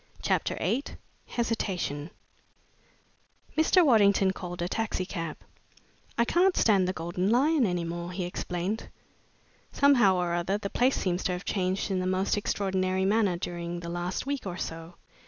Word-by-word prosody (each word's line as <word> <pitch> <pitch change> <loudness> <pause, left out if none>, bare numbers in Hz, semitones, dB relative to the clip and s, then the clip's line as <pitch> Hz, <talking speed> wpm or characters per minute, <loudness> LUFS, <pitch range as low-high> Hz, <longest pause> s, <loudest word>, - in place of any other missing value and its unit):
CHAPTER - - 0
VIII 265 +5 0 0.4
HESITATION 185 -10 -2 1.5
Mr. 325 +3 +4
Waddington 200 -6 +5
called 180 -2 -5
a - - -1
taxicab. 185 -6 -3 0.8
"I 235 - +3
can't 360 +7 +3
stand 195 -4 +4
the - - +1
Golden 175 +2 -2
Lion 270 +2 +3
any 175 -2 -1
longer," 170 +1 -5
he 185 - -2
explained. 180 +4 -3 0.8
"Somehow 245 -9 +5
or 175 -1 0
other, 175 +3 0
the 200 -1 -5
place 255 +2 +2
seems 180 -1 -1
to 185 - +1
have 180 +1 -5
changed 190 +1 -1
in 190 - +1
the 185 - -1
most 185 +1 +1
extraordinary 190 -2 0
manner' 200 -3 +2
during 175 0 -4
the 170 - -6
last 175 +5 -3
week 280 -6 -3
or 180 -1 -4
so. 165 0 -6
185 Hz, 150 wpm, -28 LUFS, 175-220 Hz, 1.5 s, Waddington